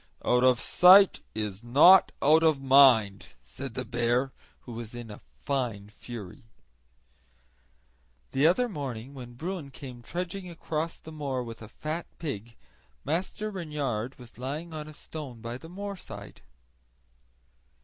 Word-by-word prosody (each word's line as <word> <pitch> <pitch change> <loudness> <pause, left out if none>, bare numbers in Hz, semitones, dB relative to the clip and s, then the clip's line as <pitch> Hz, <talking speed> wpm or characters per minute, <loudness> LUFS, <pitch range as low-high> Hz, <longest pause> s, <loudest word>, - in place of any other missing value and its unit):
"Out 125 0 +3
of 130 -2 +5
sight 190 +2 +7 0.2
is 105 -1 -4
not 150 +10 +7
out 155 +3 +6
of 160 -3 +3
mind!" 130 - +5
said 115 - -8
the 130 - -3
bear, 120 +3 0 0.3
who 120 - -10
was 115 0 -7
in 120 -2 -8
a 105 - -10 0.2
fine 120 -8 -2
fury. 110 -3 -9 1.9
The 140 +4 +4
other 245 +9 +3
morning, 135 - -6
when 120 -3 -10
Bruin 165 +1 -5
came 130 -3 -10
trudging 180 +6 -5
across 165 -1 -4
the 160 - -12
moor 140 -5 -3
with 115 -1 -9
a 110 - -10
fat 155 +6 -5
pig, 115 -8 -6 0.5
Master 185 +8 -2
Reynard 145 - -3
was 120 -1 -14
lying 150 +6 -5
on 155 -1 -6
a 155 - -10
stone 145 -6 -8
by 120 +2 -6
the 165 - -12
moorside. 200 +1 -8
135 Hz, 140 wpm, -28 LUFS, 120-160 Hz, 1.9 s, sight